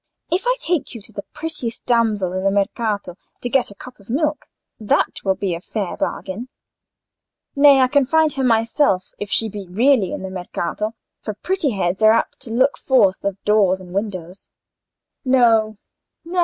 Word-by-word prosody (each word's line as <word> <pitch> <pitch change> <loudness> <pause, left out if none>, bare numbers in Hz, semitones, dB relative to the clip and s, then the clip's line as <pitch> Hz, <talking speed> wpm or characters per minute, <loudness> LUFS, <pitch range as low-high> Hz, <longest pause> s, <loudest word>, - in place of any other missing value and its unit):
If 370 +8 0
I - - +3
take 340 - -2
you 230 - -7
to 215 - -11
the 200 - -5
prettiest 295 -8 -5
damsel 215 -6 +1
in 185 0 -2
the 195 - +3
Mercato 200 -2 -1 0.2
to 245 - -3
get 255 0 +2
a 200 - -12
cup 250 +5 -12
of 200 - -20
milk—that 285 -5 -2
will 190 -1 +1
be 190 -3 -2
a 170 - -5
fair 200 -1 -4
bargain." 210 +7 -4 1.1
"Nay; 280 -1 +7
I 255 - +5
can 280 +1 +3
find 315 +1 +3
her 270 - -2
myself, 225 -4 +2
if 205 - -5
she 225 - +2
be 205 -2 -7
really 220 +1 +3
in - - -5
the 190 - -5
Mercato; 190 +4 -4 0.2
for 215 - -5
pretty 355 - -1
heads 190 0 -1
are 215 0 +7
apt 230 - -1
to 225 - -7
look 260 +4 +2
forth 205 -8 +3
of 200 -1 -2
doors 200 -3 +3
and 180 -1 -12
windows. 190 -3 -5 0.7
No, 230 -5 +3 0.5
no. 355 +2 -2
220 Hz, 180 wpm, -20 LUFS, 195-260 Hz, 1.1 s, Nay